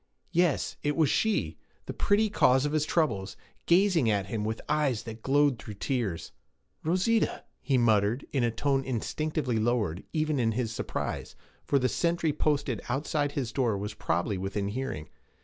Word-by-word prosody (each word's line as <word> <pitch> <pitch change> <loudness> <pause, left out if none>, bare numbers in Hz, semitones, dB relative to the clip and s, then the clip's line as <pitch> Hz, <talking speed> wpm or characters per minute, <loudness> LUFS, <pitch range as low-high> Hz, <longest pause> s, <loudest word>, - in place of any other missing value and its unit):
Yes, 175 -3 +1
it 145 0 0
was 160 -4 +3
she, 220 -1 0 0.3
the - - -5
pretty 215 +1 +2
cause 130 -9 +3
of 145 - -1
his 155 -1 +1
troubles, 105 - 0 0.3
gazing 175 - +4
at 100 -3 +1
him 105 +2 -3
with 110 +1 -2
eyes 145 -7 +1
that 115 -1 -8
glowed 140 -1 +3
through 105 -2 -8
tears. 105 - -2 0.5
'Rosita!' 185 +7 +1 0.2
he 135 -3 +1
muttered, 110 +1 +2
in 135 -4 +1
a 120 - +3
tone 135 +4 0
instinctively 130 0 -1
lowered, 110 -7 0
even 155 -2 0
in 115 -2 +2
his 115 -1 -2
surprise, - - -4 0.3
for 140 - +3
the 130 -1 +2
sentry 170 0 0
posted 145 -6 0
outside 145 +2 -1
his 125 -5 -2
door 120 -6 +1
was 105 +2 -4
probably 90 +1 -1
within 100 +1 -2
hearing. 110 - -4
130 Hz, 165 wpm, -28 LUFS, 110-150 Hz, 0.5 s, gazing